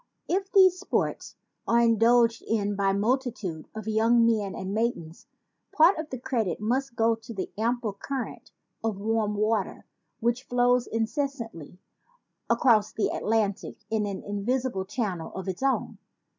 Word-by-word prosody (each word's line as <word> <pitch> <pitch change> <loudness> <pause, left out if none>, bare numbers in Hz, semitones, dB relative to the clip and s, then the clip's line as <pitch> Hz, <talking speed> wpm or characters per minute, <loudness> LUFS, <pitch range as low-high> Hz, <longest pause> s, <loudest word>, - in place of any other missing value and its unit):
If 390 +2 -1
these 370 -2 +6
sports - - -2 0.3
are 235 - +4
indulged 230 0 +4
in 205 -2 0
by 195 0 +1
a - - +2
multitude 215 - -1
of 220 0 -7
young 225 +2 +4
men 215 -4 +1
and 190 +1 -4
maidens, 215 -8 -3 0.4
part 325 +3 +5
of 315 -1 -5
the 260 - -5
credit 235 -8 -2
must 245 +4 -1
go 230 0 +3
to 225 +1 -8
the 190 - -4
ample 230 0 -1
current 260 +5 -5 0.3
of 220 -3 -1
warm 215 0 0
water 215 -1 -1 0.3
which 235 +2 0
flows 245 0 +2
incessantly 225 - -3 0.7
across 230 -3 +4
the 220 - 0
Atlantic 215 -3 -1
in 215 -2 0
an 195 -1 -5
invisible 205 0 -2
channel 195 -6 -3
of 190 -1 -6
its 185 +3 -4
own. 270 0 0
225 Hz, 145 wpm, -27 LUFS, 205-245 Hz, 0.7 s, these